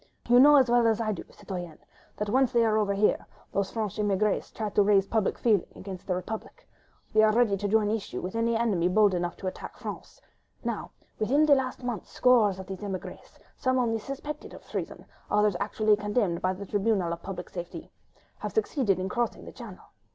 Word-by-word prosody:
You 245 +1 +6
know 295 +3 +8
as 265 -3 +6
well 240 -1 +4
as 225 0 +2
I 220 -2 0
do, 195 - -5
citoyenne, 175 -5 -7 0.4
that 210 - -2
once 260 +4 +2
they 235 -2 +3
are 215 -1 +2
over 205 -2 +1
here, 210 +2 +1 0.2
those 200 -1 0
French 215 -4 -3
émigrés 205 0 0
try 215 -2 -4
to 205 - +3
rouse 200 -1 +4
public 215 -1 0
feeling 215 -6 +2
against 185 -2 -8
the 185 - 0
Republic.... 210 +5 -7 0.5
They 215 - +6
are 215 0 +5
ready 225 -2 +3
to 205 +1 -2
join 210 0 +2
issue 220 -2 -3
with 185 - -5
any 230 0 +1
enemy 210 -7 +1
bold 205 +1 +4
enough 175 -1 -2
to - - -9
attack 185 - -7
France.... - - -8 0.4
Now, - - -3 0.3
within 275 +8 +3
the 295 - +6
last 260 -2 -1
month, 240 -6 -4
scores 230 -6 +3
of 190 - -7
these 190 -1 -7
émigrés, 195 -3 -7 0.2
some 255 -1 0
only 230 -3 +1
suspected 280 +5 -7
of - - -14
treason, - - -5 0.2
others 210 -2 +3
actually 215 +1 +2
condemned 205 -4 -1
by 185 0 +1
the 200 +2 -7
Tribunal 200 -4 0
of 170 - -7
Public 185 -2 -7
Safety, 175 -1 -7 0.5
have - - -5
succeeded 265 - +1
in 185 0 -2
crossing 240 +4 -2
the - - -9
Channel. - - -11
210 Hz, 205 wpm, -28 LUFS, 195-235 Hz, 0.5 s, know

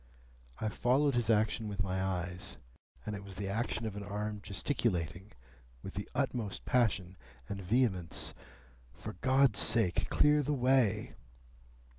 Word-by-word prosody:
I 110 - -1
followed 135 +6 +2
his 120 -2 0
action 110 0 +2
with 100 -2 -2
my 95 0 -1
eyes, 90 -1 -3 0.5
and 105 - -3
it 100 - -7
was 100 -1 -9
the 100 +1 -3
action 115 +2 -1
of 110 -2 -4
an 105 - -5
arm 105 +1 -4
gesticulating, 100 - -1 0.5
with - - -7
the - - -5
utmost 110 -6 -1
passion 95 -7 +1 0.3
and 100 -1 -5
vehemence, 95 -4 +1 0.6
"For - - -7
God's 130 -5 +4
sake, 110 -6 +2
clear 150 0 +4
the 145 +1 0
way!" 125 -5 +2
105 Hz, 140 wpm, -33 LUFS, 95-120 Hz, 0.6 s, God's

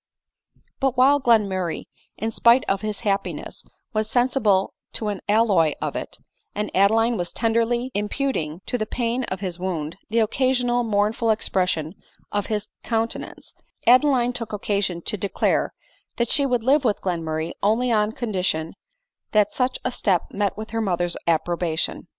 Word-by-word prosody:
But 270 -2 0
while 275 +3 +5
Glenmurray, 200 -8 +2 0.4
in_spite 235 +3 +4
of 195 0 0
his 215 -1 -3
happiness, 200 -3 -2 0.3
was 215 0 0
sensible 240 -6 +2 0.2
to 215 - -1
an 200 -2 -4
alloy 205 -8 +4
of - - -3
it, - - -5 0.4
and 210 0 -2
Adeline 225 +5 +3
was 175 -1 -3
tenderly 230 +2 0
impu 265 +7 -1
ting 155 -1 -4
to 245 - -2
the 215 - -2
pain 240 +2 -1
of 190 +1 -5
his 180 -3 -3
wound 170 -3 -3
the 225 - -1
occasionally 245 +1 +2
mournful 215 +2 +1
expression 180 -7 0 0.4
of 205 -1 -1
his 210 -2 -2 0.2
countenance, 225 0 -3 0.3
Adeline 250 0 +5
took 230 -3 -5
occasion 200 -4 -1
to 210 - -2
declare 200 +1 0 0.4
that 235 -1 0
she 280 -2 +3
would 245 -3 0
live 275 +4 +4
with 215 -5 +1
Glenmurray 165 -3 -2
only 230 +4 +2
on 210 -1 +2
condition 185 -9 -2 0.6
that 210 -1 +3
such 255 0 0
a 255 - +1
step 195 -7 0
met 200 -1 -1
with 220 +1 -7
her 225 0 -1
mother's 175 -4 0
appro 170 +1 +2
bation. 160 -3 -2
215 Hz, 155 wpm, -23 LUFS, 190-240 Hz, 0.6 s, while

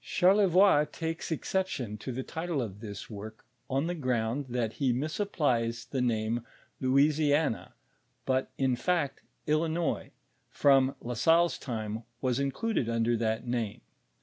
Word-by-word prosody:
Charlevoix 185 -4 +5
takes 165 0 -4
exception 160 - -2
to 130 - -5
the 130 +2 -3
title 165 0 -3
of 105 -5 -4
this 105 -2 -7
work 110 +1 -9 0.2
on 135 +3 +1
the 175 - -1
ground 130 -3 -1
that 120 -3 -1
he 135 -2 +3
misapplies 125 - 0
the 130 - 0
name 115 -1 0 0.4
Louisiana, 145 +1 +2 0.5
but 130 0 +1
in 130 -2 +2
fact 145 +2 0 0.2
Illinois, 160 +1 0 0.4
from 135 -1 +4
La 125 - -4
Salle's 165 +5 +3
time, 110 -3 -4 0.2
wos 130 -1 0
in 140 0 +1
cluded 220 - -1
under 115 0 +1
that 110 +1 -1
name. 120 -2 -2
130 Hz, 135 wpm, -30 LUFS, 115-160 Hz, 0.5 s, Charlevoix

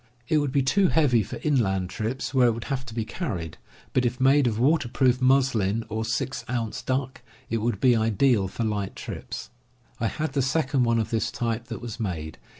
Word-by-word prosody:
It 155 - +3
would 145 -2 -1
be 140 0 +2
too 190 +9 +3
heavy 140 -9 +3
for 100 - -6
inland 95 -11 +1
trips, 120 +5 -3
where 130 -2 +5
it 120 - +3
would 115 +1 -6
have 130 -1 -4
to 115 - -8
be 115 -2 -1
carried; 90 - -4 0.3
but 125 - +2
if 125 +1 -1
made 135 +1 +5
of 110 -3 -1
waterproofed 130 -2 +2
muslin 125 -5 +2
or 110 +1 -2
6 120 +4 -2
ounce 115 -4 -2
duck, 130 0 -2 0.3
it 115 - +1
would 110 -2 -1
be 125 -2 +5
ideal 110 -1 +2
for 100 +5 -4
light 105 -3 -2
trips. - - -7 0.5
I 115 - +1
had 155 +3 -3
the 140 - +1
second 135 -1 +1
one 115 0 +2
of 110 - -1
this 110 -3 0
type 115 -1 -2
that 115 -3 -7
was 120 -1 -6
made. 80 -7 -4
120 Hz, 205 wpm, -26 LUFS, 110-135 Hz, 0.5 s, where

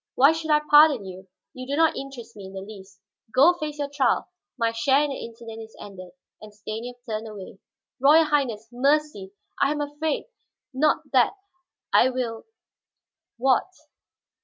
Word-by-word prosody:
Why 275 +4 +6
should 320 0 -4
I 300 0 +4
pardon 295 -7 +6
you? 190 0 -10 0.3
You 255 0 -8
do 280 - -2
not 325 -1 +3
interest 250 -4 -8
me 200 -2 -9
in 190 - -12
the 190 - -6
least. 195 -1 -12 0.4
Go 290 +7 +6
face 300 -1 -5
your 290 -1 -2
trial; 280 -3 0 0.3
my 230 -2 +1
share 265 +5 +2
in 295 - -2
the 270 - -6
incident 225 -1 -9
is 220 0 -12
ended," 185 -3 -11 0.3
and 215 0 -11
Stanief 220 +3 -7
turned 220 0 -4
away. 195 -2 -10 0.4
"Royal 295 +5 +6
Highness, 255 -8 -1
mercy 275 -6 0 0.3
I 280 - +3
am 300 - -2
afraid! 295 +2 -2 0.5
Not 300 +4 +2
that - - +4 0.6
I 255 - +5
will 245 -3 -4 0.5
" - - -65
"What?" 260 +7 +2
255 Hz, 165 wpm, -24 LUFS, 215-290 Hz, 0.6 s, Why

